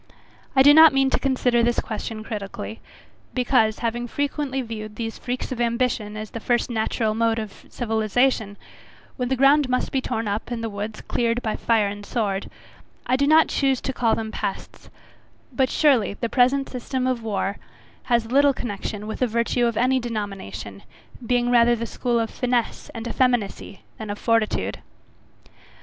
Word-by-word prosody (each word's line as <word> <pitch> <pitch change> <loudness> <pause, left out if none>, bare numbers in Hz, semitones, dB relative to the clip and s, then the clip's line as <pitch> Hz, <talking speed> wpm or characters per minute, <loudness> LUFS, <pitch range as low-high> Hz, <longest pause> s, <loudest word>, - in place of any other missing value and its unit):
I 265 - +7
do 290 +1 +8
not 320 0 +8
mean 270 0 +2
to - - +1
consider 255 -3 +2
this 240 0 +2
question 215 0 -5
critically; 215 0 -6 0.6
because, 245 -4 +2
having 240 +1 -2
frequently 280 0 -2
viewed 215 -2 -7
these 225 0 -5
freaks 250 +1 -4
of 245 -2 -3
ambition 235 -3 -1
as 215 0 -6
the 230 - -5
first 240 +2 0
natural 220 -1 0
mode 225 0 +1
of 215 -3 -7
civilization, 220 -1 0 0.6
when 250 -2 -2
the 265 - +2
ground 275 +1 +4
must 255 0 0
be 265 - 0
torn 225 -3 -3
up, 205 +3 -3
and 235 -2 -4
the 225 - -3
woods 210 +2 -5
cleared 235 0 -1
by 220 - -1
fire 225 -3 +2
and 205 0 -6
sword, 200 -3 -2 0.6
I 255 - +2
do 280 +2 +2
not 315 +1 +5
choose 270 -2 +1
to 265 - -3
call 235 -3 +2
them 220 -1 -4
pests; - - -5 0.6
but 260 +1 +2
surely 255 -10 +3
the 235 - -3
present 265 +3 +3
system 255 +1 -3
of 255 -2 0
war, 200 -2 -2 0.5
has 235 -2 +2
little 280 +1 +5
connection 210 -2 -5
with 220 - -5
virtue 235 0 +1
of 230 -2 -2
any 255 +2 +3
denomination, 195 - -6 0.4
being 245 +1 +1
rather 240 0 +5
the 230 0 -4
school 240 0 -1
of 225 -1 -2
FINESSE 245 -3 -1
and 230 +1 -5
effeminacy, 235 -6 -1 0.2
than 220 -1 -6
of 205 - -3
fortitude. 230 -1 0
235 Hz, 170 wpm, -23 LUFS, 220-255 Hz, 0.6 s, do